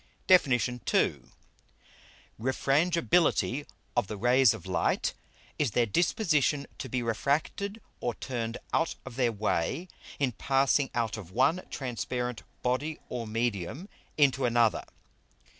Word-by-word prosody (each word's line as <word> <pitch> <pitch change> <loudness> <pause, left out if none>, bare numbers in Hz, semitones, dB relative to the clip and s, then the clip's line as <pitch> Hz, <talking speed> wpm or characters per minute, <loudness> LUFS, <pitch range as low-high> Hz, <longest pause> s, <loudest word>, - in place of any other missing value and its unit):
DEFIN. 180 -7 +6 0.4
II. - - +2 1.2
_Refrangibility 150 +2 +2 0.3
of 120 -5 +2
the 105 - -5
Rays 125 +2 +5
of 110 -7 -6
Light, 95 - 0 0.5
is 145 -4 +2
their 120 - +5
Disposition 150 - +1
to 130 - -5
be 125 0 -1
refracted 150 - -1 0.2
or 120 -2 -2
turned 115 -3 -4 0.2
out - - +1
of - - -8
their 125 -2 +2
Way 110 - -1 0.3
in 135 -3 +1
passing 135 +3 +2
out 115 -2 0
of 95 -6 -9
one 135 - +2
transparent 125 -2 -3 0.2
Body 140 +5 -1
or 120 -2 -4
Medium 115 - -2 0.3
into 135 -3 +3
another. 120 -2 +2
125 Hz, 120 wpm, -29 LUFS, 115-145 Hz, 1.2 s, DEFIN